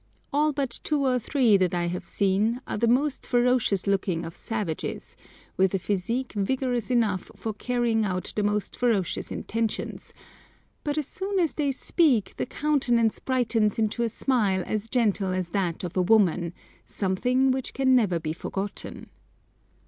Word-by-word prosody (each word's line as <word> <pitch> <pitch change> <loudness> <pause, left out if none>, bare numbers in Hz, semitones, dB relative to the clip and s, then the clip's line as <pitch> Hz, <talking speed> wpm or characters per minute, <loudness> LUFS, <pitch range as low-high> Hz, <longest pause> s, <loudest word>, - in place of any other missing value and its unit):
All 300 +2 +3
but 275 -4 -3
two 295 -2 0
or 250 -1 +2
three 240 -4 +3
that 180 -2 +1
I 175 0 0
have 175 +1 -4
seen 205 +4 +1
are - - -4
the 235 - +2
most 265 +4 +1
ferocious 245 -5 +2
looking 190 -4 0
of 165 - -8
savages, 210 -8 -4 0.4
with 190 0 +3
a - - +3
physique 210 +7 -2
vigorous 245 +3 -1
enough 220 -7 +1
for 220 - -4
carrying 235 -1 0
out 185 -3 -2
the 210 - +1
most 205 0 -1
ferocious 225 -7 0
intentions, 225 -1 -3 0.7
but 295 0 -2
as 300 -3 -1
soon 390 +1 -3
as 335 -4 +1
they 285 -3 0
speak 265 - +2
the - - -2
countenance 245 -7 +1
brightens 230 -5 +1
into 220 +1 0
a 235 - +1
smile 210 -6 +1
as 215 +1 -3
gentle 205 -6 +1
as 185 -2 -2
that 185 -1 -1
of 175 - -5
a 185 - +3
woman, 180 -4 +3 0.4
something 250 +7 +1
which 260 0 -2
can 260 -1 +4
never 200 -9 +2
be 155 -1 -3
forgotten. 195 +4 -5
225 Hz, 160 wpm, -26 LUFS, 195-255 Hz, 0.7 s, can